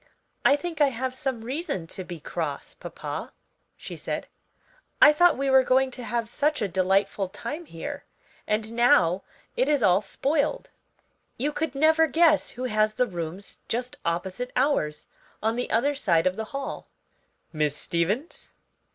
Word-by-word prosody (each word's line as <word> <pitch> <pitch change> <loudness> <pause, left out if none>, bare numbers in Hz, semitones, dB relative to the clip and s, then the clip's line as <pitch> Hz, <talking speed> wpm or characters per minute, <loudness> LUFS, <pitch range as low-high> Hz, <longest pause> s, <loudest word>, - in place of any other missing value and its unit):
"I 280 - +6
think 325 0 -4
I 290 - +7
have 260 0 -2
some 260 -4 -3
reason 265 - -3
to 185 +3 -6
be 175 -2 -8
cross, 150 -2 -4
papa," - - -6 0.5
she - - -8
said; - - -4 0.7
"I 300 - +9
thought 350 0 +5
we 275 +1 -1
were 265 0 +7
going 260 +1 +3
to 250 - -7
have 235 -1 -2
such 295 +5 0
a 210 - 0
delightful 190 +1 +1
time 295 - -6
here, 285 - -6 0.4
and 220 +1 -1
now 190 -7 +4 0.3
it - - +1
is 290 -5 +2
all 185 0 +5
spoiled. 285 - -1 0.7
You 285 +5 0
could 300 -2 -3
never 315 +3 +4
guess 320 -1 +4
who 250 - -7
has 215 -3 +1
the 250 - +2
rooms 175 -1 -7
just 245 +2 -2
opposite 185 +8 -2
ours; 250 - +1 0.4
on 225 +1 +1
the 245 - -2
other 275 +6 +2
side 175 - +2
of 185 0 +2
the 220 - -4
hall." 275 +4 -6 0.7
"Miss 150 -2 0
Stevens?" 195 - -2
240 Hz, 160 wpm, -26 LUFS, 190-285 Hz, 0.7 s, I